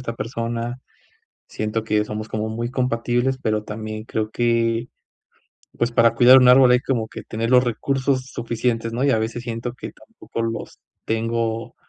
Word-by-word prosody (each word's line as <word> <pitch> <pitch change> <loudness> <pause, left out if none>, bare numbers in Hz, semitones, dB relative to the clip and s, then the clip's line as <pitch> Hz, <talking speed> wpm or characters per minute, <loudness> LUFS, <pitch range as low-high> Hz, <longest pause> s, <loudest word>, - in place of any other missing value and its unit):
esta 115 -2 -4
persona. 115 +1 -4 0.7
Siento 110 +1 -3
que 105 -1 +1
somos 105 0 -5
como 110 0 -2
muy 120 +2 -4
compatibles, 125 0 0
pero 110 -3 0
también 110 0 -6
creo 110 -1 -3
que, 115 0 +1 0.9
pues 120 - 0
para 115 -1 +4
cuidar 125 +2 +8
un 125 - +5
árbol 125 0 +7
hay 125 - +6
como 115 -5 -2
que 110 - -8
tener 115 +1 -3
los 125 0 +6
recursos 130 +2 -1
suficientes, 115 0 -2
¿no?, 120 +3 -2
y 140 - +3
a 110 - +3
veces 115 +2 -3
siento 120 0 -4
que - - -8
tampoco 220 - -9
los 115 0 -4 0.3
tengo 115 0 -2
115 Hz, 165 wpm, -22 LUFS, 110-125 Hz, 0.9 s, cuidar